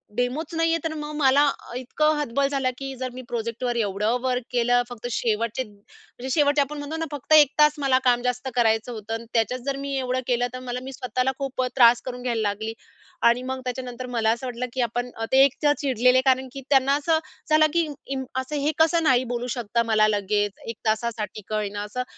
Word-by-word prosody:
डेमोच 255 Hz, +7 st, -2 dB
नाही 330 Hz, 0 st, +2 dB
आहे, 330 Hz, -, +1 dB
तर 325 Hz, -1 st, -2 dB
मग 300 Hz, -1 st, -6 dB
मला 285 Hz, 0 st, +4 dB, 0.3 s
इतकं 305 Hz, +5 st, +1 dB
हतबल 280 Hz, -1 st, 0 dB
झालं 275 Hz, -2 st, 0 dB
की 270 Hz, 0 st, -5 dB
जर 255 Hz, -, -2 dB
मी 255 Hz, -, -7 dB
प्रोजेक्टवर 235 Hz, +1 st, -3 dB
एवढं 210 Hz, +1 st, 0 dB
वर्क 255 Hz, -1 st, -1 dB
केलं 245 Hz, 0 st, +3 dB
फक्त 245 Hz, 0 st, -6 dB
शेवटचे 230 Hz, +2 st, -1 dB
म्हणजे 210 Hz, +4 st, -13 dB
शेवटचे 290 Hz, 0 st, +3 dB
आपण 295 Hz, +2 st, -3 dB
म्हणतो 290 Hz, +2 st, -5 dB
ना 325 Hz, -, -2 dB
फक्त 290 Hz, +1 st, -1 dB
1 295 Hz, -3 st, +7 dB
तास 300 Hz, 0 st, +6 dB
मला 270 Hz, -2 st, +3 dB
काम 245 Hz, -1 st, +3 dB
जास्त 250 Hz, +1 st, -2 dB
करायचं 225 Hz, 0 st, +2 dB
होतं 225 Hz, -1 st, -6 dB
आणि 225 Hz, +1 st, -4 dB
त्याच्यात 230 Hz, +2 st, +1 dB
जर 275 Hz, -1 st, -1 dB
मी 275 Hz, 0 st, -4 dB
एवढं 255 Hz, -1 st, -1 dB
केलं 245 Hz, 0 st, +1 dB
तर 255 Hz, -, -5 dB
मला 250 Hz, -1 st, -4 dB
मी 265 Hz, -, -7 dB
स्वतःला 255 Hz, 0 st, -1 dB
खूप 270 Hz, -1 st, -2 dB
अ, 255 Hz, -, +1 dB
त्रास 240 Hz, -2 st, +6 dB
करून 250 Hz, -1 st, -5 dB
घ्यायला 245 Hz, -2 st, -1 dB
लागली. 220 Hz, +2 st, -3 dB, 0.5 s
आणि 235 Hz, +1 st, +3 dB
मग 260 Hz, 0 st, -4 dB
त्याच्यानंतर 250 Hz, 0 st, -5 dB
मला 230 Hz, -3 st, 0 dB
असं 235 Hz, +3 st, -3 dB
वाटलं 250 Hz, 0 st, -3 dB
की 260 Hz, -, -1 dB
आपण 245 Hz, +1 st, -1 dB, 0.2 s
ते 265 Hz, +1 st, +7 dB
एकतर 290 Hz, +2 st, +3 dB
चिडलेले 255 Hz, -2 st, +3 dB
कारण 260 Hz, 0 st, +3 dB
की 275 Hz, -, -7 dB
त्यांना 275 Hz, 0 st, +4 dB
असं 315 Hz, +2 st, +1 dB, 0.3 s
झालं 310 Hz, 0 st, +6 dB
की 335 Hz, -1 st, +2 dB, 0.5 s
असं 260 Hz, +3 st, -4 dB
हे 295 Hz, -, +2 dB
कसं 325 Hz, +1 st, +3 dB
नाही 260 Hz, -4 st, +4 dB
बोलू 245 Hz, 0 st, -3 dB
शकता 235 Hz, -1 st, -1 dB
मला 215 Hz, -2 st, +3 dB
लगेच 205 Hz, 0 st, 0 dB, 0.2 s
1 230 Hz, -, -4 dB
तासासाठी 220 Hz, -1 st, -2 dB
का 215 Hz, -, -3 dB
होईना 205 Hz, -1 st, -2 dB
असं 210 Hz, +5 st, -4 dB
250 Hz, 210 wpm, -24 LUFS, 235-275 Hz, 0.5 s, 1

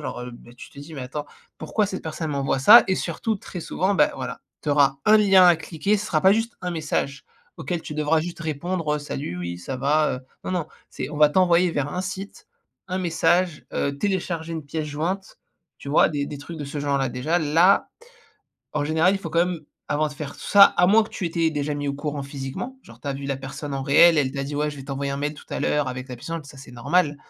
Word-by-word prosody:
genre, -, -, -5 dB
heu, 125 Hz, 0 st, -6 dB
ben 120 Hz, 0 st, -14 dB
tu 120 Hz, -, -12 dB
te -, -, -15 dB
dis: 155 Hz, +3 st, -10 dB
«Mais 140 Hz, -, -6 dB
attends 145 Hz, +4 st, -5 dB, 0.3 s
pourquoi 210 Hz, -2 st, 0 dB
cette 190 Hz, -1 st, -5 dB
personne 160 Hz, 0 st, -4 dB
m'envoie 140 Hz, -1 st, -1 dB
ça?» 215 Hz, -, +9 dB
et 190 Hz, -, +3 dB
surtout, 185 Hz, +6 st, -2 dB
très 185 Hz, -, -9 dB
souvent 190 Hz, +4 st, -1 dB
ben 150 Hz, -6 st, +4 dB
voilà, 125 Hz, -1 st, -6 dB, 0.2 s
tu -, -, -4 dB
auras 140 Hz, -1 st, +3 dB
un 215 Hz, -, +7 dB
lien 195 Hz, -3 st, +6 dB
à 175 Hz, -2 st, +6 dB
cliquer, 165 Hz, +5 st, -1 dB
ce 210 Hz, -, -4 dB
sera 155 Hz, -, +1 dB
pas 190 Hz, +3 st, +6 dB
juste 225 Hz, +2 st, -1 dB
un 180 Hz, -, -3 dB
message, 150 Hz, -4 st, -2 dB, 0.3 s
auquel 175 Hz, -3 st, -4 dB
tu 150 Hz, -, -7 dB
devras 155 Hz, +1 st, +2 dB
juste 170 Hz, +2 st, -6 dB
répondre, 165 Hz, +2 st, -3 dB
heu: -, -, -4 dB
«Salut, 140 Hz, -10 st, -5 dB
oui 85 Hz, 0 st, -5 dB
ça 130 Hz, +9 st, -5 dB
va?» 150 Hz, +4 st, +2 dB
heu, -, -, -9 dB, 0.2 s
non, -, -, -3 dB
non 175 Hz, -4 st, -1 dB, 0.2 s
c'est, -, -, -5 dB
on 150 Hz, -, -6 dB
va 150 Hz, 0 st, +6 dB
t'envoyer 180 Hz, +1 st, +4 dB
vers 145 Hz, -1 st, -2 dB
un 180 Hz, -, -2 dB
site, 195 Hz, +1 st, -7 dB, 0.4 s
un 185 Hz, 0 st, -2 dB
message, 175 Hz, -1 st, +1 dB
heu, 140 Hz, -, -1 dB
télécharger 175 Hz, -3 st, -2 dB
une 160 Hz, -2 st, -5 dB
pièce-jointe, 160 Hz, +5 st, -4 dB, 0.4 s
tu -, -, -9 dB
vois? 145 Hz, -, +5 dB
Des 145 Hz, -2 st, -2 dB
des 145 Hz, -, -7 dB
trucs 160 Hz, +3 st, -9 dB
de 145 Hz, -, -4 dB
ce 145 Hz, +2 st, -6 dB
genre-là. 140 Hz, -2 st, 0 dB
Déjà 130 Hz, +8 st, 0 dB
là, 165 Hz, +5 st, +4 dB, 0.9 s
en 150 Hz, -1 st, 0 dB
général, 160 Hz, +5 st, +3 dB
il -, -, -2 dB
faut 165 Hz, -4 st, -7 dB
quand 170 Hz, +2 st, +3 dB
même, 180 Hz, -3 st, -4 dB, 0.3 s
avant 150 Hz, +1 st, +1 dB
de -, -, -10 dB
faire 145 Hz, -1 st, -6 dB
tout -, -, -15 dB
ça, 200 Hz, -1 st, +8 dB
à 175 Hz, -, +3 dB
moins 220 Hz, +3 st, +6 dB
que -, -, -12 dB
tu 190 Hz, -, -5 dB
étais 165 Hz, -1 st, +1 dB
déjà 150 Hz, -1 st, -2 dB
mis 145 Hz, 0 st, -4 dB
au 140 Hz, -, -1 dB
courant 145 Hz, 0 st, -4 dB
physiquement, 140 Hz, -, -6 dB
genre -, -, -16 dB
tu -, -, -12 dB
as -, -, 0 dB
vu 140 Hz, +1 st, -7 dB
la 140 Hz, -1 st, -1 dB
personne 135 Hz, +2 st, -7 dB
en 135 Hz, -, -3 dB
réel, 155 Hz, +4 st, +6 dB
elle 135 Hz, -2 st, +1 dB
t'a 140 Hz, -, -3 dB
dit: 145 Hz, +1 st, -5 dB
«Ouais, 150 Hz, +1 st, 0 dB
je 145 Hz, -, -9 dB
vais 135 Hz, -, -8 dB
t'envoyer 140 Hz, 0 st, -3 dB
un -, -, -3 dB
mail 145 Hz, +1 st, -2 dB
tout -, -, -14 dB
à -, -, -3 dB
l'heure 150 Hz, -1 st, +1 dB
avec 130 Hz, +1 st, -6 dB
la 125 Hz, -, -6 dB
pièce 120 Hz, -, -12 dB
jointe», 165 Hz, -2 st, -4 dB
ça 140 Hz, 0 st, -13 dB
c'est 130 Hz, -2 st, -12 dB
normal. 145 Hz, +5 st, +1 dB
150 Hz, 255 wpm, -24 LUFS, 140-175 Hz, 0.9 s, ça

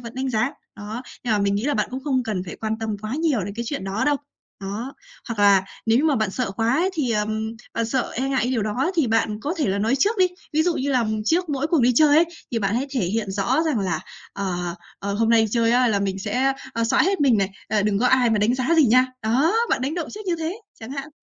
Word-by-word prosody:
vẫn 235 Hz, 0 st, -9 dB
đánh 260 Hz, 0 st, -2 dB
giá. 240 Hz, +3 st, 0 dB, 0.2 s
Đó, 215 Hz, +3 st, -6 dB, 0.2 s
nhưng 235 Hz, -, +1 dB
mà 210 Hz, -, +2 dB
mình 200 Hz, 0 st, +1 dB
nghĩ 205 Hz, +3 st, -1 dB
là 290 Hz, +1 st, +1 dB
bạn -, -, 0 dB
cũng 260 Hz, -, -4 dB
không 265 Hz, -4 st, +1 dB
cần 215 Hz, -6 st, -3 dB
phải 175 Hz, -, -8 dB
quan 220 Hz, 0 st, -3 dB
tâm 220 Hz, -2 st, -2 dB
quá 215 Hz, +3 st, -3 dB
nhiều 300 Hz, -7 st, +1 dB
đến 200 Hz, +1 st, -6 dB
cái 235 Hz, +2 st, -4 dB
chuyện 280 Hz, -10 st, -4 dB
đó 195 Hz, +3 st, -1 dB
đâu, 295 Hz, -1 st, +3 dB, 0.4 s
đó. 215 Hz, +8 st, -5 dB, 0.3 s
Hoặc 230 Hz, -, -4 dB
là 200 Hz, -2 st, +5 dB, 0.2 s
nếu 225 Hz, +1 st, +4 dB
như 290 Hz, -, +1 dB
mà 300 Hz, -4 st, +3 dB
bạn 215 Hz, -3 st, 0 dB
sợ 245 Hz, +1 st, -2 dB
quá 225 Hz, +4 st, 0 dB
ấy 365 Hz, +5 st, +2 dB
thì, 295 Hz, -8 st, -1 dB
ờ, 210 Hz, -2 st, +1 dB, 0.5 s
bạn 230 Hz, -, 0 dB
sợ 255 Hz, +2 st, -1 dB
e 265 Hz, +3 st, -1 dB
ngại 265 Hz, -2 st, +1 dB
cái 245 Hz, -, 0 dB
điều 235 Hz, -5 st, 0 dB
đó 245 Hz, -, 0 dB
thì 320 Hz, -7 st, +2 dB
bạn 220 Hz, -1 st, 0 dB
có 300 Hz, +4 st, -2 dB
thể 290 Hz, -, +1 dB
là 195 Hz, +1 st, 0 dB
nói 225 Hz, +6 st, +1 dB
trước 415 Hz, -, +1 dB
đi. 370 Hz, -, +6 dB, 0.3 s
Ví 310 Hz, +1 st, +3 dB
dụ 345 Hz, -1 st, +1 dB
như 280 Hz, +2 st, -1 dB
là 245 Hz, -4 st, +2 dB, 0.2 s
trước 345 Hz, +6 st, +1 dB
mỗi 285 Hz, -1 st, -1 dB
cuộc 320 Hz, -2 st, +2 dB
đi 245 Hz, +1 st, +4 dB
chơi 295 Hz, +3 st, +5 dB
ấy, 330 Hz, -, +6 dB, 0.3 s
thì 235 Hz, -, 0 dB
bạn 200 Hz, 0 st, 0 dB
hãy 260 Hz, +4 st, 0 dB
thể 265 Hz, -, -1 dB
hiện 210 Hz, +1 st, -2 dB
rõ 200 Hz, +11 st, +1 dB
rằng 300 Hz, -7 st, +1 dB
là, 175 Hz, -5 st, -1 dB, 0.3 s
ờ, 180 Hz, -3 st, -3 dB, 0.2 s
ờ, 200 Hz, 0 st, -3 dB
hôm 225 Hz, +2 st, +1 dB
nay 230 Hz, -, +6 dB
đi 220 Hz, -, 0 dB
chơi 230 Hz, 0 st, +2 dB
á 250 Hz, 0 st, +4 dB
là 205 Hz, -3 st, +1 dB
mình 195 Hz, -1 st, -2 dB
sẽ, 250 Hz, +7 st, 0 dB, 0.2 s
ờ, 230 Hz, 0 st, 0 dB
xõa 230 Hz, -, +3 dB
hết 385 Hz, 0 st, +1 dB
mình 265 Hz, -6 st, +4 dB
này, 195 Hz, 0 st, 0 dB, 0.2 s
à, 215 Hz, -1 st, +1 dB
đừng 205 Hz, -1 st, +1 dB
có 250 Hz, -, +2 dB
ai 250 Hz, -3 st, +4 dB
mà 215 Hz, -, +2 dB
đánh 215 Hz, +4 st, +2 dB
giá 260 Hz, +6 st, +1 dB
gì 310 Hz, -5 st, +6 dB
nha. 255 Hz, +3 st, +5 dB, 0.2 s
Đó, 255 Hz, -, +2 dB, 0.2 s
bạn -, -, +1 dB
đánh 275 Hz, +4 st, -1 dB
động 340 Hz, -3 st, -3 dB
trước 425 Hz, -1 st, -9 dB
như 345 Hz, -2 st, 0 dB
thế, 330 Hz, +7 st, -4 dB, 0.2 s
chẳng 220 Hz, -, -8 dB
hạn. 275 Hz, +1 st, -5 dB
235 Hz, 285 wpm, -23 LUFS, 210-280 Hz, 0.5 s, đi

